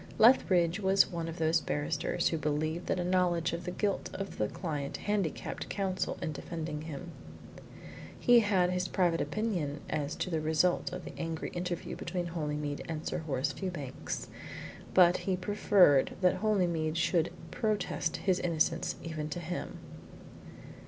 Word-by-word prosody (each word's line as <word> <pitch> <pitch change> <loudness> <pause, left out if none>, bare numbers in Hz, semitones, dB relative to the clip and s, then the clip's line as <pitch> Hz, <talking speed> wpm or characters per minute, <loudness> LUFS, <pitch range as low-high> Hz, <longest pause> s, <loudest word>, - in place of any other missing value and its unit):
Lethbridge 185 -7 +5
was 195 0 +4
one 170 -2 -3
of 165 +1 -6
those 160 0 +2
barristers 145 +3 0
who 165 - -1
believe 155 +3 -1
that - - 0
a - - 0
knowledge 175 -2 +2
of 170 +1 -4
the - - -2
guilt 200 +2 -1
of 195 - -5
a 105 - +3
client 145 - -4
handicapped 205 -6 -2
Counsel 190 -2 -1
in 160 - -1
defending 155 0 -5
him. 160 +2 -7 1.1
He 245 -1 +7
had 190 -5 +3
his 180 0 0
private 175 -3 +2
opinion 175 -10 -1
as 145 -1 -1
to 185 - -3
the 160 -1 0
result 160 +4 +2
of 180 0 -6
the - - -7
angry 165 -1 -3
interview 175 -1 -4
between 175 +1 -3
Holymead 150 -3 -3
and 160 -1 -4
Sir - - -1
Horace 145 -3 -1
Fewbanks, 150 -6 -5 0.7
but 180 -1 +7
he 190 -2 -1
preferred 185 -6 +4
that 185 0 +4
Holymead 175 -6 +1
should 165 0 +2 0.2
protest 210 -6 -1
his 185 -2 +1
innocence 170 +1 +1
even 155 -2 -4
to 165 - -3
him. 175 +1 -5
170 Hz, 150 wpm, -31 LUFS, 155-185 Hz, 1.1 s, He